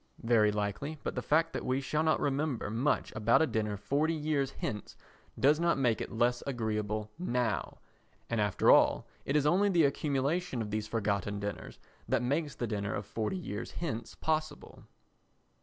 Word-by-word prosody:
Very 115 Hz, -3 st, +4 dB
likely, 105 Hz, +9 st, -3 dB
but -, -, -2 dB
the 125 Hz, -, -2 dB
fact 165 Hz, +5 st, +2 dB
that -, -, -3 dB
we 130 Hz, +1 st, 0 dB
shall 150 Hz, +3 st, -1 dB
not 160 Hz, 0 st, +2 dB
remember 140 Hz, -6 st, -1 dB
much 125 Hz, +7 st, 0 dB
about 115 Hz, +8 st, +4 dB
a -, -, +4 dB
dinner 105 Hz, -6 st, -1 dB
forty 145 Hz, +11 st, 0 dB
years 150 Hz, -3 st, 0 dB
hence 105 Hz, -2 st, -5 dB, 0.4 s
does 150 Hz, +3 st, +4 dB
not 170 Hz, -2 st, +2 dB
make 125 Hz, -5 st, +1 dB
it -, -, -5 dB
less 120 Hz, +1 st, +1 dB
agreeable 110 Hz, -4 st, -2 dB
now, 125 Hz, -, -1 dB, 0.5 s
and 115 Hz, -2 st, 0 dB
after 105 Hz, -2 st, +3 dB
all -, -, +5 dB, 0.2 s
it 140 Hz, -, -1 dB
is 150 Hz, -1 st, +3 dB
only 190 Hz, +7 st, +4 dB
the 175 Hz, -4 st, +4 dB
accumulation 140 Hz, +2 st, 0 dB
of 105 Hz, -2 st, -3 dB
these 110 Hz, 0 st, -2 dB
forgotten 105 Hz, -2 st, -1 dB
dinners 100 Hz, -1 st, -5 dB, 0.3 s
that -, -, +2 dB
makes 145 Hz, +3 st, -1 dB
the 120 Hz, -, -2 dB
dinner 105 Hz, -2 st, -2 dB
of 100 Hz, -, -4 dB
forty 110 Hz, -, -2 dB
years 105 Hz, -, -5 dB
hence 130 Hz, -9 st, -4 dB
possible. 155 Hz, -1 st, -3 dB
125 Hz, 175 wpm, -31 LUFS, 105-150 Hz, 0.5 s, all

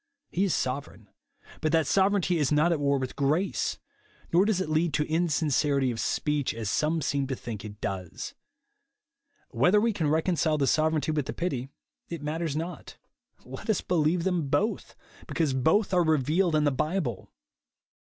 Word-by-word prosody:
He 190 Hz, +3 st, +1 dB
is 190 Hz, -, +1 dB
sovereign; 125 Hz, -6 st, -4 dB, 0.5 s
but 155 Hz, -, +1 dB
that 160 Hz, -2 st, +3 dB
sovereignty 190 Hz, -1 st, +2 dB
is 145 Hz, -2 st, +1 dB
not 150 Hz, +4 st, +3 dB
at 165 Hz, -, +1 dB
v/ar 140 Hz, -1 st, +2 dB
with 130 Hz, -1 st, -4 dB
grace; 155 Hz, +7 st, 0 dB, 0.6 s
nor 180 Hz, +4 st, +5 dB
does 210 Hz, -3 st, +1 dB
it 185 Hz, -, -1 dB
lead 155 Hz, 0 st, +1 dB
to 150 Hz, -, +1 dB
insincerity 150 Hz, -4 st, +1 dB
of 115 Hz, -, -5 dB
speech, 150 Hz, -5 st, -1 dB
as 110 Hz, -4 st, -3 dB
some 155 Hz, +1 st, 0 dB
seem 140 Hz, -1 st, 0 dB
to 135 Hz, -, -2 dB
think 110 Hz, -5 st, -7 dB
it 105 Hz, -1 st, -9 dB
does. 95 Hz, -3 st, -5 dB, 1.2 s
Whether 180 Hz, -, +3 dB
we 230 Hz, +1 st, +1 dB
can 165 Hz, -7 st, 0 dB
reconcile 160 Hz, -1 st, +1 dB
the 140 Hz, -, +2 dB
sovereignty 155 Hz, +1 st, +1 dB
Avith 150 Hz, -3 st, -1 dB
the -, -, -3 dB
pity, 135 Hz, -7 st, -3 dB, 0.4 s
it 170 Hz, -3 st, -6 dB
matters 155 Hz, 0 st, -2 dB
not. 170 Hz, +3 st, -6 dB, 0.5 s
Let 225 Hz, -, -9 dB
us 215 Hz, -, +2 dB
believe 165 Hz, 0 st, +1 dB
thein 175 Hz, -5 st, 0 dB
both, 210 Hz, +10 st, -1 dB, 0.3 s
because 155 Hz, -5 st, 0 dB
both 160 Hz, -, +2 dB
are 180 Hz, -1 st, +4 dB
revealed 160 Hz, +3 st, +2 dB
in 150 Hz, -, +3 dB
the 145 Hz, -, +3 dB
Bible. 150 Hz, -, -2 dB
155 Hz, 170 wpm, -27 LUFS, 140-175 Hz, 1.2 s, nor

